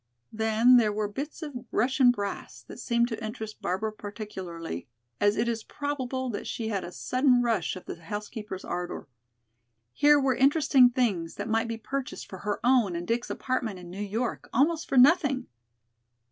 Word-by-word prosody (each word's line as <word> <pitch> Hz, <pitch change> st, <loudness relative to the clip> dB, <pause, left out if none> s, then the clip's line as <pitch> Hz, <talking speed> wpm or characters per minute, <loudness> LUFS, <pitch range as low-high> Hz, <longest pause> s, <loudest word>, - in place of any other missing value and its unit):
Then 220 Hz, +3 st, +5 dB
there 220 Hz, -3 st, +3 dB
were 210 Hz, 0 st, -1 dB
bits 285 Hz, +10 st, -6 dB
of 295 Hz, -2 st, -6 dB, 0.2 s
Russian 260 Hz, +2 st, +3 dB
brass, 205 Hz, -5 st, -3 dB
that -, -, -11 dB
seemed 235 Hz, -1 st, +1 dB
to 225 Hz, -, -5 dB
interest 220 Hz, -1 st, -6 dB
Barbara 210 Hz, +4 st, -2 dB
particularly, 190 Hz, -, -7 dB, 0.3 s
as 205 Hz, 0 st, +3 dB
it 225 Hz, +2 st, +1 dB
is 230 Hz, -2 st, -2 dB
probable 265 Hz, -3 st, -3 dB
that 205 Hz, -, -5 dB
she 225 Hz, -2 st, -3 dB
had 200 Hz, -4 st, -2 dB
a 175 Hz, -, -7 dB
sudden 255 Hz, +3 st, +2 dB
rush 210 Hz, -, 0 dB
of 185 Hz, -, -10 dB
the 170 Hz, -, -7 dB
housekeeper's 210 Hz, 0 st, -6 dB
ardor. 175 Hz, -3 st, -4 dB, 0.9 s
Here 295 Hz, -, +5 dB
were 270 Hz, -1 st, +2 dB
interesting 275 Hz, -2 st, +5 dB
things 210 Hz, -10 st, -1 dB
that -, -, -4 dB
might 225 Hz, +1 st, +1 dB
be 230 Hz, 0 st, -3 dB
purchased 270 Hz, +4 st, -5 dB
for 190 Hz, -, -9 dB
her 205 Hz, +2 st, -2 dB
own 240 Hz, -7 st, +3 dB
and 175 Hz, +1 st, -4 dB
Dick's 235 Hz, +1 st, -1 dB
apartment 240 Hz, -6 st, -2 dB
in 175 Hz, -1 st, -10 dB
New 195 Hz, +3 st, -6 dB
York 220 Hz, +4 st, -3 dB
almost 315 Hz, +6 st, +1 dB
for 270 Hz, -, +1 dB
nothing! 275 Hz, -1 st, +5 dB
225 Hz, 175 wpm, -28 LUFS, 205-255 Hz, 0.9 s, Then